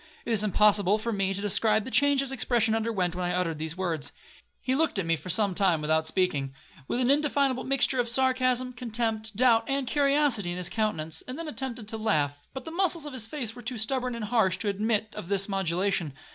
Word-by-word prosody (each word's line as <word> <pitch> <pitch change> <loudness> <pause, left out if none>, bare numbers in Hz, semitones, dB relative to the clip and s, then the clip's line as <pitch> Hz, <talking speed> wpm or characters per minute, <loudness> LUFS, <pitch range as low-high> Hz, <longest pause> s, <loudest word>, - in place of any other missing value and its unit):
It - - -3
is 215 -1 +2
impossible 205 -1 +3
for 230 +1 -3
me 195 -1 0
to 195 +1 -4
describe 215 +1 +2
the 260 - -7
change 285 +3 +3
his 275 -1 -3
expression 235 -3 +1
underwent 215 -6 -1
while 180 0 -3
I - - -1
uttered 165 -4 -2
these 160 +2 -5
words. 170 -6 -3 0.5
He 260 - -1
looked 320 -3 +1
at 195 - -1
me 165 0 +2
for 160 +3 -10
some 200 +1 +2
time 180 -4 +2
without 155 +1 0
speaking, 145 -7 -1 0.3
with 245 - -2
an 250 +1 +3
indefinable 280 -3 +1
mixture 265 -1 +2
of 240 -1 +1
sarcasm, 255 0 +1
contempt, 225 -2 -3
doubt, 230 0 +4
and 275 0 0
curiosity 280 -8 +2
in 175 - -3
his 180 -1 -1
countenance, 175 -7 -2
and 255 +2 -6
then 330 -1 -5
attempted 255 -7 -3
to 225 - -1
laugh, 145 -9 -1
but 265 - -8
the 320 - -7
muscles 340 -3 +2
of 295 - -7
his 230 -4 -2
face 240 -5 -4
were 245 - -10
too 245 +1 -4
stubborn 250 +2 -1
and 230 -2 -4
harsh 205 -5 +1
to 205 +2 -2
admit 215 +1 -1
of 175 - -7
this 195 -1 +1
modulation. 190 -4 -1
220 Hz, 220 wpm, -27 LUFS, 185-255 Hz, 0.5 s, doubt